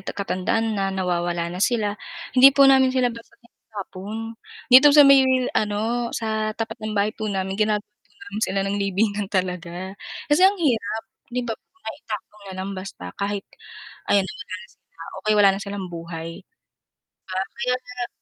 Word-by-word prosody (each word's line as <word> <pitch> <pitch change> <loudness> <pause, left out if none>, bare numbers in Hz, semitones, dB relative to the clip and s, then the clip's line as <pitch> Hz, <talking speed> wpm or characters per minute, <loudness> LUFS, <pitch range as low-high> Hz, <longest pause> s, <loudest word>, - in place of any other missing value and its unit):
ta 190 - -7
katandaan 205 +3 -1
na 195 -2 0
nawawala 175 -2 -1
na 180 - -6
sila, 210 -2 +1 0.4
hindi 260 +1 +9
po 275 - +8
namin 265 -1 +6
sila 255 -2 +1
basta 230 0 -13
tinatapon. 220 -1 -8 0.4
Dito 265 +4 +10
sa 290 - +10
may 275 -1 +8 0.3
ano, 220 +3 0
sa 220 -1 -2
tapat 225 -1 -5
ng 215 -1 -4
bahay 205 +2 +2
po 215 -1 -4
namin 190 -1 -2
ginagawan 210 -1 +1 0.2
po - - -33
namin 205 +2 -7
sila 195 - 0
ng 195 +1 -1
libingan 200 +1 0
talaga. 180 -1 -3 0.3
Kasi 295 +4 +2
ang 405 - -2
hirap, 225 - 0 0.2
'di 250 0 -3
ba, 230 - -2
po 370 - -14
na 220 - -3
itapon 210 0 -7
nalang 190 +1 -5
basta 185 - -8
kahit 200 0 -2 0.6
ayan 200 -1 +4
na 190 - -6
wala 185 0 -6
na - - -19
sila, 165 - -17 0.2
o - - -38
kaya 215 0 +3
wala 205 -1 +7
na 195 - -4
silang 200 -2 -5
buhay. 165 -1 -6 1.2
Ah, - - -16
kaya 250 -1 +1
sara 250 -1 -5
205 Hz, 180 wpm, -23 LUFS, 190-230 Hz, 1.2 s, Dito